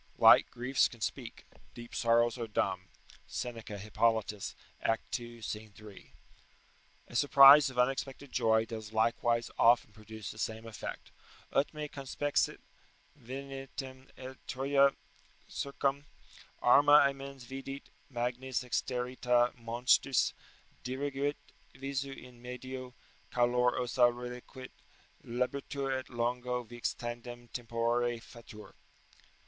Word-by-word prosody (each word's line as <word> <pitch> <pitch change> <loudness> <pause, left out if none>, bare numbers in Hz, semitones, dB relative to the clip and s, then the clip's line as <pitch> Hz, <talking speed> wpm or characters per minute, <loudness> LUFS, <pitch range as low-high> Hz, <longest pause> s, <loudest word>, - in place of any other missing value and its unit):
["Light - - +7
griefs 125 +2 +2
can 120 - -14
speak: 120 +1 -4 0.3
deep 120 0 -10
sorrows 115 0 +3
are 115 - -3
dumb." 95 -3 -1 0.4
Seneca, 115 -4 -5
Hippolytus, 110 0 0 0.3
act 115 +2 -1
ii. 120 -1 -10
scene 105 0 -5
3.] 105 -2 -13 1.0
A - - -11
surprise 140 +1 +8
of 130 - -11
unexpected 135 +2 -1
joy 110 0 +3
does 110 -2 -7
likewise 115 +1 +1
often 120 -2 +5
produce 110 0 -8
the 110 - -12
same 110 0 -3
effect: 115 -2 -7 0.4
"Ut 140 - +2
me 150 -1 -5
conspexit 145 +1 -1 0.6
venientem, 135 0 -8
et 130 0 -9
Troja 140 +1 +3 0.5
circum 140 0 -2 0.6
Arma 145 +4 +7
amens 140 -1 -7
vidit, 135 +2 -8 0.2
magnis 125 0 -2
exterrita 125 0 +1
monstris, 120 +2 +2 0.5
Diriguit 140 +2 -2 0.4
visu 135 +1 -3
in 125 -2 -12
medio, 125 0 -7 0.3
calor 125 0 +2
ossa 125 0 +3
reliquit, 125 +1 -8 0.5
Labitur, 135 +2 -2
et 130 -1 -3
longo 125 +1 -1
vix 120 0 -4
tandem 120 0 -7
tempore 120 0 -1
fatur." 115 -2 -13
125 Hz, 110 wpm, -32 LUFS, 115-135 Hz, 1.0 s, surprise